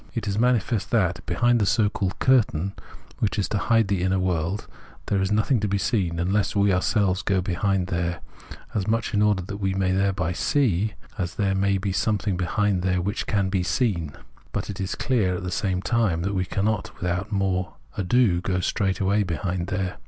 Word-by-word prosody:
It 115 -3 -3
is 100 +1 -1
manifest 115 -4 +1
that 90 -8 +1
behind 120 +7 +2
the 105 - +2
so 110 0 +3
called 95 -2 -2
curtain, 100 -8 +2 0.5
which 105 -2 0
is 100 - 0
to 105 - 0
hide 115 +1 +3
the 100 -2 0
inner 95 +1 +1
world, 90 +1 -1 0.4
there 100 -2 0
is 95 +1 0
nothing 110 +4 +2
to 105 - 0
be 100 0 0
seen 95 -4 0
unless 95 +5 0
we 100 -1 +3
ourselves 95 +1 +1
go 95 -2 +1
behind 95 +1 0
there, 85 0 -2 0.5
as 100 -3 -1
much 115 0 0
in 105 - +2
order 105 -3 +2
that 100 +3 -6
we 95 -2 -1
may 95 -1 +1
thereby 95 -2 +1
see, 105 - +1 0.3
as 85 -3 -2
that 105 - -1
there 95 -1 +2
may 100 0 +2
be 95 +1 -2
something 100 +1 0
behind 95 +2 0
there 90 0 +1
which 100 +5 -2
can 100 -2 +1
be 95 -1 0
seen. 90 - 0 0.4
But - - -3
it 100 - -6
is 95 - -2
clear 105 -9 +1
at 90 - -5
the 90 - -3
same 95 -4 -1
time 95 -5 +1
that 100 +2 -1
we 95 -1 0
cannot 105 +2 -2
without 90 +1 -2
more 95 -3 -1 0.2
ado 100 -2 +2
go 90 0 -1
straightway 95 +2 +1
behind 90 -1 -2
there. 95 -1 -3
95 Hz, 200 wpm, -24 LUFS, 90-105 Hz, 0.5 s, so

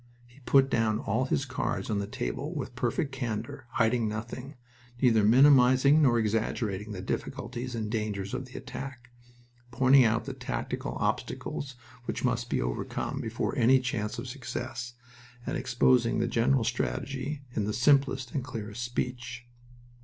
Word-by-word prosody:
He 120 +3 -20
put 135 -1 +6
down 115 -4 +1
all 110 +5 0
his 135 +1 0
cards 130 -1 -2
on 105 - +1
the 100 - -3
table - - -4
with - - -4
perfect 140 - -1
candor, 120 -2 -4
hiding 115 -1 +2
nothing, 120 +6 -6 0.4
neither 115 -5 +4
minimizing 130 +4 +6
nor 125 -5 +4
exaggerating 105 -2 -1
the 95 -3 -5
difficulties 120 +5 -4
and 110 -2 -2
dangers 105 -2 -3
of 130 +1 -3
the 130 - -10
attack, 135 -3 -8 0.6
pointing 130 +2 +5
out 115 0 +2
the 135 - -4
tactical 130 -1 -4
obstacles 135 -3 -2 0.3
which - - -2
must - - 0
be - - +1
overcome - - -3
before - - -2
any 130 +3 +5
chance 115 -5 -2
of - - -5
success, 120 -1 -5 0.5
and - - -2
exposing 125 -1 +3
the 115 - +1
general 120 +2 +2
strategy 135 - -2
in 105 - 0
the 105 - -1
simplest 130 0 +3
and 135 - -1
clearest 115 -3 -6
speech. 120 0 -4
120 Hz, 150 wpm, -29 LUFS, 110-130 Hz, 0.6 s, put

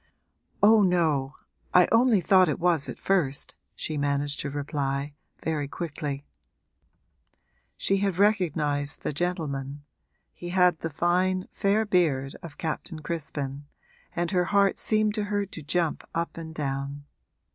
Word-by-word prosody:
'Oh 215 +1 +7
no, 160 -8 +2 0.4
I 180 -1 +7
only 230 -3 +5
thought 185 -1 +5
it - - 0
was 170 -4 +2
at - - -6
first,' 165 -8 0 0.2
she 155 -2 -3
managed 145 0 0
to 140 - -2
reply, 140 0 -2 0.3
very 155 -3 -1
quickly. 145 -3 -5 1.5
She 195 - +1
had 195 -3 0
recognised 155 -8 +1
the - - -2
gentleman 145 -4 -3 0.5
he 175 - -8
had 180 -2 +3
the 165 - -3
fine 185 +4 +1
fair 205 +3 +1
beard 150 -9 +1
of 160 -4 -10
Captain 160 0 -4
Crispin 145 -3 -4 0.5
and 175 +1 -1
her 180 -2 +2
heart 200 +1 +3
seemed 215 -1 +2
to 210 0 -1
her 205 0 -1
to 165 - -9
jump 160 +2 -1
up 165 0 -2
and 160 -1 -8
down. 140 0 -3
165 Hz, 135 wpm, -27 LUFS, 145-185 Hz, 1.5 s, Oh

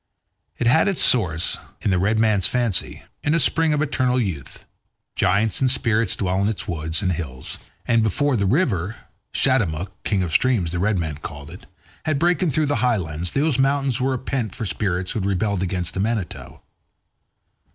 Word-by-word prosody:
It - - -1
had 130 - +4
its 195 -4 +1
source, 90 -9 +2 0.2
in 100 - +1
the 90 - +2
red 105 +4 +1
man's 110 -4 +3
fancy, 120 -6 -1 0.2
in 150 +2 +2
a - - +3
spring 160 +3 +2
of 150 0 +1
eternal 130 -3 +1
youth; 90 - -4 0.5
giants 100 +3 +1
and 130 - +3
spirits 115 -5 +1
dwelt 95 -1 -1
in 100 - +2
its 110 -2 -3
woods 80 +1 -2
and 90 - +1
hills, 70 -7 -5 0.3
and 115 0 +3
before 135 +6 +1
the 100 -4 +1
river 110 - +1 0.4
Shatemuc, 95 - +1
king 100 -3 0
of 85 -3 -4
streams, 110 -11 +2
the 85 - -2
red 100 +2 +1
men 80 -4 -3
called 75 -1 -9
it 90 - -12 0.4
had 155 -2 +1
broken 175 +2 +2
through 155 +2 +1
the 145 0 0
highlands, 90 -9 0
those 140 -2 +1
mountains 135 -2 +1
were 130 0 +1
a - - -1
pent 125 -4 -3
for 110 - -4
spirits 95 -2 -1
who - - -1
had 100 0 -1
rebelled 100 0 0
against 90 -2 -2
the - - -4
Manitou. 105 -2 -3
105 Hz, 185 wpm, -22 LUFS, 90-130 Hz, 0.5 s, had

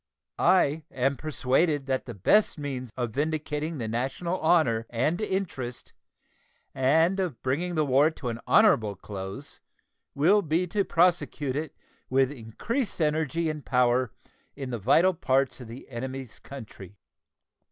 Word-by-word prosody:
I 165 -4 +3
am 135 +2 0
persuaded 145 +1 0
that 130 -1 -2
the 120 - -6
best 205 - +3
means 135 -4 -5
of 120 -3 -2
vindicating 150 +3 -2
the 115 -4 -3
national 135 +10 -2
honor 120 -9 +2
and 155 - 0
interest 170 - -4 0.8
and 160 +8 +3
of 175 -10 -2
bringing 170 +7 -1
the 155 -1 +2
war 140 +3 +4
to 145 -6 -6
an 115 0 -4
honorable 115 - +4
close 95 +7 -7 0.6
will 185 +9 +4
be 165 +1 0
to 200 +3 0
prosecute 165 -6 +1
it 150 0 -4 0.3
with 135 +1 +3
increased 145 - -4
energy 160 +1 0
and 155 -2 -4
power 125 -1 +2 0.4
in 135 -2 -6
the 120 - -3
vital 165 - +4
parts 135 -4 0
of 125 - -9
the 115 +4 -10
enemy's 130 0 -6
country. 105 -7 -11
140 Hz, 140 wpm, -27 LUFS, 125-165 Hz, 0.8 s, war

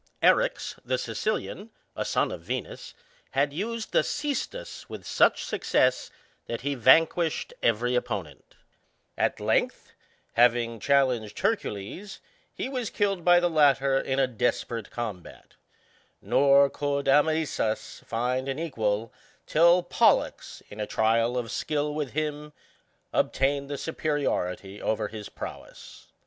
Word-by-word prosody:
Erix, - - +2
the 130 +1 0
Sicilian^ 200 - -3 0.3
a - - -2
son - - 0
of - - -6
Venus^ - - -5 0.4
had 140 +1 +2
used 220 +6 -4
the - - +4
ccestus 295 - -4
with - - -8
such - - +3
success^ - - +1 0.4
that 115 - -4
he 140 +2 -1
vanquished 160 +6 +3
every 120 +2 +1
opponent; 120 -5 -4 0.6
at - - 0
length, - - -1 0.4
having 115 -1 +3
challenged 125 -5 +1
Hercules^ 195 - -3 0.3
he - - -4
was 255 -4 -3
killed 195 -4 -1
by 175 0 +6
the 175 - +2
latter 140 -4 +3
in 135 0 -2
a 135 - +4
desperate 115 -2 -2
combat: 110 -7 -7 0.7
nor 140 0 +5
could 140 0 -2
Amycus 150 -5 +1
find 125 +3 -2
an 135 - -2
equals 115 -9 -2 0.3
till 170 +3 +5
Polltix, 175 - +1
in 105 - -11
a 105 - -2
trial 115 +2 +1
of 120 -2 -3
skill 150 -1 -1
with 150 -3 -4
him^ 150 -1 -3 0.6
obtained 140 +1 +1
the 145 - -3
superiority 105 - -2
over 110 -1 -1
his 105 -2 -8
prowess. - - -10
140 Hz, 125 wpm, -27 LUFS, 115-160 Hz, 0.7 s, by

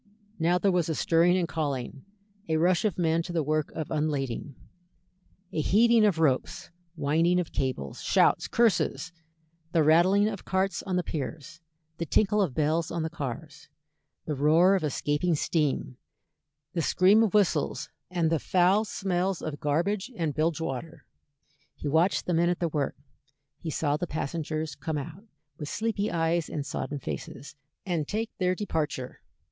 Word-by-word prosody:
Now 170 +2 +3
there 195 +2 +2
was 175 -2 +1
a 160 - 0
stirring 170 +4 +3
and 175 -2 0
calling; 140 -4 -3 0.5
a 160 - +2
rush 175 +5 +2
of 205 -6 0
men 165 -1 +2
to 175 - -6
the 165 -2 0
work 155 +1 0
of 160 -2 -5
unlading; 145 -4 -2 1.0
a 155 - 0
heaving 225 +6 +4
of 200 -6 +2
ropes, 145 -6 0 0.2
winding 165 +4 +2
of 175 - -3
cables, 130 - -3
shouts, - - +3
curses, 220 -6 +1 0.6
the 165 -3 +4
rattling 180 +7 +5
of 200 -4 -4
carts 190 -1 0
on 185 - -1
the 180 - +1
piers, 155 +1 -6 0.4
the 170 - -3
tinkle 210 +5 +2
of 160 -11 -1
bells 160 +2 +1
on 170 -2 -2
the 160 - -3
cars, 150 0 -7 0.6
the 155 - -2
roar 160 +7 +4
of 190 -4 +1
escaping 150 +3 0
steam, 145 -5 -1 0.8
the 170 - 0
scream 190 +7 +4
of 215 -2 +1
whistles, 205 -4 +1 0.2
and 170 -3 0
the 165 - +2
foul 185 +6 +3
smells 190 -2 -1
of 150 -2 -4
garbage 190 - -1
and 165 -6 -1
bilge 155 +1 0
water. 160 +1 -5 0.7
He - - -6
watched 160 +6 +2
the 180 - -1
men 170 +1 +3
at 175 - 0
their 170 - -1
work, 145 -3 -2 0.6
he 165 - -5
saw 145 -1 0
the 175 - -3
passengers 155 0 -3
come 155 +1 -4
out, 165 +8 -7 0.3
with 150 -2 -5
sleepy 215 -1 -1
eyes 165 0 0
and 145 -2 -4
sodden 145 +1 -4
faces, 140 +1 -7 0.3
and 170 -6 -1
take 220 +2 -2
their 185 0 +2
departure. 150 -10 -3
165 Hz, 165 wpm, -27 LUFS, 150-185 Hz, 1.0 s, rattling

